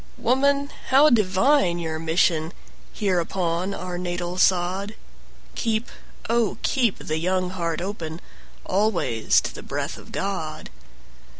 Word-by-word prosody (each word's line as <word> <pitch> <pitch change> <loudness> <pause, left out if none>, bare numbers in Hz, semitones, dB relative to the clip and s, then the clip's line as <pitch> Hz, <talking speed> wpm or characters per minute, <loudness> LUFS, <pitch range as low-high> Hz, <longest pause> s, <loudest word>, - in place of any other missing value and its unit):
Woman, 280 +3 +2 0.2
how 280 +3 +6
divine 195 -1 +3
your 160 -2 -3
mission 160 0 +1 0.4
Here 195 -4 0
upon 175 +2 -1
our 180 -1 -5
natal 175 0 -3
sod! 190 +4 +2 0.6
Keep, 225 0 -1 0.4
oh, 230 -3 +1
keep 240 -7 +2
the 155 +1 -3
young 185 +1 0
heart 170 -3 -2
open 170 -4 -5 0.5
Always 185 - +2
to - - -5
the - - -8
breath - - -4
of - - -14
God! 160 -6 -4
185 Hz, 120 wpm, -24 LUFS, 170-220 Hz, 0.6 s, how